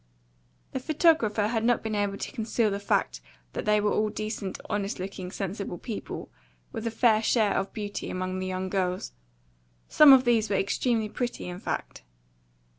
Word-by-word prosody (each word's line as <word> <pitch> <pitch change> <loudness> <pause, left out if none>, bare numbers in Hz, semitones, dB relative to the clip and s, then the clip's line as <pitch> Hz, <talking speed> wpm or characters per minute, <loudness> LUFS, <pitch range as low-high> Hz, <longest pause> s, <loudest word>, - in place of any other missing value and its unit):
The 265 - -2
photographer 275 -8 +3
had 225 +1 0
not 240 0 +2
been 220 -1 -3
able 205 -1 0
to - - -5
conceal 225 -3 0
the 200 - -2
fact 200 - 0 0.3
that - - -4
they 210 0 +4
were 210 0 +1
all 215 0 +1
decent, 215 -2 -4
honest 205 -1 -2
looking, 185 -1 -5
sensible 195 -1 -4
people, 225 +1 -6 0.4
with 225 - -4
a - - +2
very 225 - -15 0.2
fair - - -1
share 220 -2 +2
of 195 - -1
beauty 205 -2 -5
among 185 0 -3
the 185 - -3
young 185 0 -2
girls; 185 - -1 0.8
some 300 -2 +8
of 265 -1 +8
these 225 -3 +3
were 200 - +1
extremely 220 +3 +1
pretty, 240 0 -4
in 180 0 -6
fact. - - -4
210 Hz, 180 wpm, -27 LUFS, 195-230 Hz, 0.8 s, some